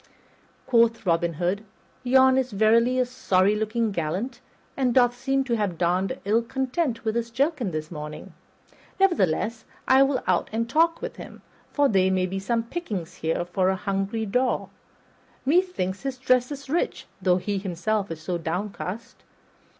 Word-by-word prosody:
Quoth 230 -2 +3
Robin 170 -1 +1
Hood, 180 +6 -1 0.4
"Yon 260 +1 +5
is 260 -1 +1
verily 230 +4 +3
a 255 - +3
sorry 205 -6 +2
looking 220 +1 -1
gallant, 195 +9 -3 0.3
and 255 -3 +1
doth 245 -1 +4
seem 270 +2 0
to 245 -3 -1
have 205 -6 -1
donned 180 +2 0
ill 215 +3 +3
content 260 0 -2
with 220 - +1
his 235 0 -2
jerkin 265 - 0
this 155 -1 -5
morning; 150 -2 -8 0.7
nevertheless, 230 - +1 0.2
I 265 +1 +6
will 275 -2 +2
out 180 -2 +1
and 230 +1 -1
talk 330 - +2
with - - -5
him, - - -11 0.3
for 285 -1 +3
there 190 -5 +3
may 185 -1 +1
be 190 +1 -3
some 230 +4 0
pickings 225 - -5
here 165 +2 -1
for 185 +1 +1
a 190 - +1
hungry 195 +3 -2
daw. 250 +5 0 0.8
Methinks 300 - +1
his 270 -1 -4
dress 255 0 +2
is 280 -1 -7
rich, 325 +6 -1 0.2
though 180 -1 +3
he 195 +2 -2
himself 195 +2 -2
is 160 -1 -7
so 175 +1 -2
downcast. 185 +5 -4
225 Hz, 160 wpm, -25 LUFS, 185-255 Hz, 0.8 s, I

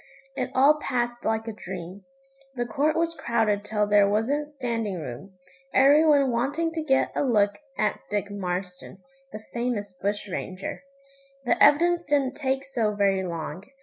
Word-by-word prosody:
It 255 -1 -2
all 285 +4 +5
passed 240 -1 -2
like 220 0 -1
a 225 - -4
dream. 185 -1 -8 0.5
The 240 -1 -1
court 285 +7 0
was 335 0 0
crowded 225 -8 0
till 210 0 0
there 205 -1 +4
wasn't 275 +8 0
standing 230 - -3
room, 160 +7 -8 0.4
every 285 +4 +6
one 280 -4 +4
wanting 285 +8 0
to 325 -1 -3
get 270 -4 +2
a - - +1
look 205 -6 +2 0.2
at 210 -1 0
Dick 205 -1 -2
Marston, 185 -1 -5 0.3
the 215 0 -8
famous 235 -5 -2
bush 200 +3 -3
ranger. 185 0 -5 0.6
The - - +1
evidence 340 +4 +5
didn't 280 -4 0
take 270 -2 -1
so 225 -6 -1
very 195 -2 +2
long. 170 0 -5
225 Hz, 155 wpm, -26 LUFS, 200-275 Hz, 0.6 s, every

